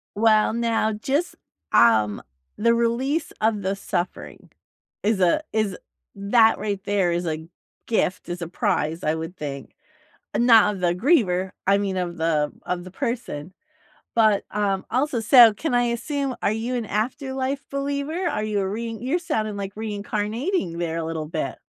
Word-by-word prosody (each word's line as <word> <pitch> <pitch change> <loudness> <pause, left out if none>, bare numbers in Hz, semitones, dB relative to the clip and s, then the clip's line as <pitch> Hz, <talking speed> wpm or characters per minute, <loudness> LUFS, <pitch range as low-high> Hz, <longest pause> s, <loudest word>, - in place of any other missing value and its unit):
Well, 215 0 +4
now, 230 -1 +1
just, 275 +11 -1 0.4
um, 110 -3 +4 0.3
the 230 +2 +3
release 250 +7 0
of 215 -1 +1
the 195 +1 -1
suffering 180 -2 -4 0.5
is 210 -1 +2
a 185 - +3
is 215 -4 0 0.4
that 220 +3 +4
right 205 -2 -2
there 200 -4 +1
is 175 0 -1
a 160 0 -3 0.4
gift, 210 -5 0
is 175 0 -5
a 170 - -4
prize, 160 -1 -1
I 155 - +2
would 165 +3 -6
think, 140 -4 -6 0.6
not 225 -3 +6
of 185 - -8
the 175 -1 +2
griever, 190 - +2
I 195 +1 +4
mean 195 -2 -2
of 175 -1 -3
the 155 -2 +1
of 180 -1 -3
the 185 - -10
person, 225 - -4 0.6
but, 215 -3 +4
um, 200 -2 0
also, 255 0 0
so 230 0 +8
can 260 +7 -3
I 245 - +4
assume, 265 +3 -2
are - - +2
you 225 +3 -2
an 240 -2 -2
afterlife 265 +5 -2
believer? 280 +5 -2
Are 215 - -1
you 210 -1 -1
a 190 - -1
rein 225 +2 -4
you're 270 +8 0
sounding 215 -11 -2
like 200 -1 -5
reincarnating 210 - -2
there 165 -1 -2
a 165 - -2
little 160 -1 -4
bit. 160 0 -3
210 Hz, 165 wpm, -23 LUFS, 180-240 Hz, 0.6 s, so